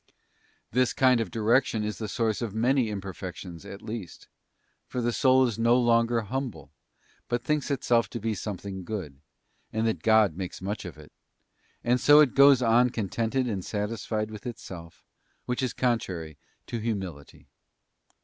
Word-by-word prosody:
This 125 +1 +2
kind 130 -3 +4
of 110 - -3
direction 115 +1 +2
is 105 0 -4
the 110 - -3
source 110 +1 -1
of 110 -3 -4
many 125 +1 +2
imperfections 95 -4 -7
at 100 - -9
least, 110 -7 -7 0.6
for 125 - -4
the 120 0 0
soul 130 0 +4
is 115 -2 -3
no 115 +1 +4
longer 115 -1 +3
humble, 110 - -5 0.6
but 120 0 -1
thinks 150 -1 0
itself 120 -4 +1
to 120 - -5
be 110 +1 -1
something 95 -1 -5
good, 85 -9 -6 0.5
and 110 +1 -1
that 110 - -1
God 110 -6 +4
makes 90 -1 -6
much 100 +3 -4
of - - -8
it; - - -14 0.7
and 125 +1 +2
so 145 +3 +7
it 145 -5 +5
goes 140 -2 +6
on 120 +2 +4
contented 115 +4 -1
and 100 -6 -3
satisfied 105 +1 -3
with 105 +2 -8
itself, 85 -8 -9 0.4
which 125 +1 -2
is 130 -2 0
contrary 95 - -2 0.3
to 115 - -4
humility. 95 -10 -5
115 Hz, 160 wpm, -27 LUFS, 100-120 Hz, 0.7 s, so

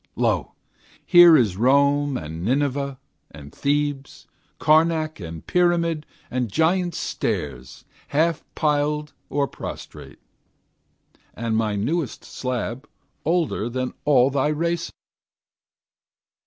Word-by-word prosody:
Lo! - - 0 0.5
here 175 -3 +8
is 105 -7 +1
Rome 140 +3 +3
and 80 +1 -6
Nineveh 140 +3 0 0.3
and 70 0 -12
Thebes, 145 -1 -2 0.3
Karnak 155 -1 +2
and 85 -3 -8
Pyramid 170 -3 +1 0.2
and 125 -2 -1
Giant's 175 - +1
Stairs 65 -3 -4 0.2
Half 160 +2 +1
piled 150 0 0 0.2
or 140 0 0
prostrate; - - -9 1.2
and 115 -1 -2
my 110 -2 0
newest 140 +9 -2
slab 125 +2 -4 0.4
Older 160 -9 0
than 130 +1 -3
all 135 -2 +4
thy 140 +1 +1
race. 170 +3 -1
145 Hz, 100 wpm, -23 LUFS, 120-160 Hz, 1.2 s, here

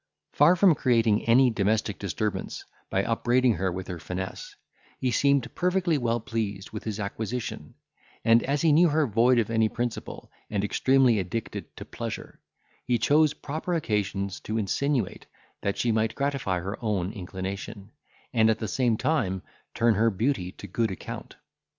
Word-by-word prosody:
Far 150 +5 +5
from 185 -1 +5
creating 115 -6 +2
any 125 +2 +5
domestic 105 -1 0
disturbance, 100 +2 -3 0.2
by 95 - +1
upbraiding 120 +2 +2
her 95 -1 0
with 90 +1 -5
her 90 -2 -5
finesse, 90 +3 -6 0.4
he 130 - 0
seemed 140 -1 +2
perfectly 180 -2 +1
well 120 -1 0
pleased 105 -5 -4
with 105 - -7
his 110 -1 -3
acquisition; 110 +3 -4 0.5
and, 115 +1 +6
as 140 +3 -1
he 160 - +5
knew 165 +3 +5
her 155 0 +2
void 120 +2 +3
of 115 -1 +1
any 110 -1 +3
principle, 120 0 -5 0.2
and 100 -2 -1
extremely 130 +1 +3
addicted 95 +5 -5
to - - -7
pleasure, - - -6 0.4
he 125 -1 +1
chose 150 +6 +3
proper 160 +4 -3
occasions 100 - -1
to 110 - -4
insinuate, 120 +3 -1 0.3
that 100 - -1
she 120 - +1
might 110 0 0
gratify 140 -11 -1
her 100 +4 -5
own 100 -3 -1
inclination, 100 +1 -6 0.4
and 110 -2 +4
at 110 - +2
the 110 - -4
same 120 0 +1
time 120 - 0 0.3
turn 115 -1 +4
her 110 +3 +3
beauty 100 -3 -1
to - - -10
good 110 +4 -1
account. 95 - -7
115 Hz, 160 wpm, -27 LUFS, 100-130 Hz, 0.5 s, and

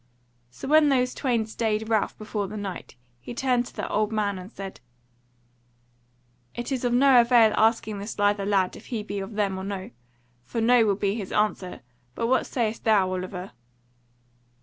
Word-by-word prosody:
So 125 - -9
when 305 +1 +5
those 250 -2 +2
twain 240 -5 0
stayed 220 -1 -2
Ralph 220 -2 0
before 210 -2 -3
the 215 +2 -7
Knight, 200 -3 -6 0.2
he 125 - -8
turned 250 -2 +1
to - - -14
the - - -3
old 215 +1 0
man 205 -3 -1
and 185 +4 -10
said: 195 -3 -8 1.8
"It 240 +3 -5
is 260 -2 -2
of 245 - +1
no 255 0 +6
avail 235 -2 +5
asking 220 -2 +2
this 205 +3 -6
lither 205 0 +2
lad 195 -2 +1
if - - -13
he 225 -4 -3
be 205 -1 -4
of 195 +3 -6
them 200 -3 0
or - - -6
no: 195 -1 -5 0.5
for 180 - -4
no 230 0 +4
will 200 - +2
be 200 0 0
his 205 -4 -5
answer. 210 -3 -1 0.3
But - - -1
what 260 +3 +2
sayest 230 -3 -2
thou, 200 -4 +3
Oliver?" 185 0 -5
215 Hz, 180 wpm, -25 LUFS, 200-240 Hz, 1.8 s, no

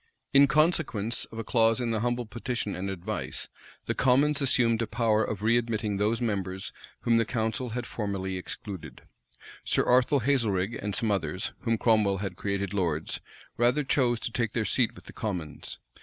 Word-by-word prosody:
In 140 +1 +8
consequence 140 - +1
of 115 - -12
a 115 - -3
clause 115 +1 +3
in 120 -2 -1
the 110 - 0
humble 120 +1 -1
petition 115 -1 -3
and 95 +2 -3
advice 90 -3 -4 0.4
the - - 0
commons 140 +3 +3
assumed 120 -4 +3
a 115 - -1
power 110 -1 +2
of 105 -1 -4
readmitting 110 -2 +1
those 105 +3 +1
members 95 -5 -2 0.3
whom 115 -1 +3
the 115 - +4
council 115 +1 -2
had 120 - -3
formerly 100 -4 -3
excluded. 95 0 -7 0.6
Sir - - +1
Arthur 125 +3 +4
Hazelrig 115 -6 +1
and 100 -1 -2
some 110 +1 +1
others, 90 -2 -1
whom 115 -2 0
Cromwell 105 -4 +3
had 95 -1 -4
created 100 +1 -2
lords, 85 -6 -1 0.4
rather 125 +5 +3
chose 125 -4 +2
to - - -3
take 115 -2 -1
their 110 - 0
seat 120 0 +1
with - - -13
the - - -11
commons. 90 -9 -4
115 Hz, 170 wpm, -28 LUFS, 100-120 Hz, 0.6 s, In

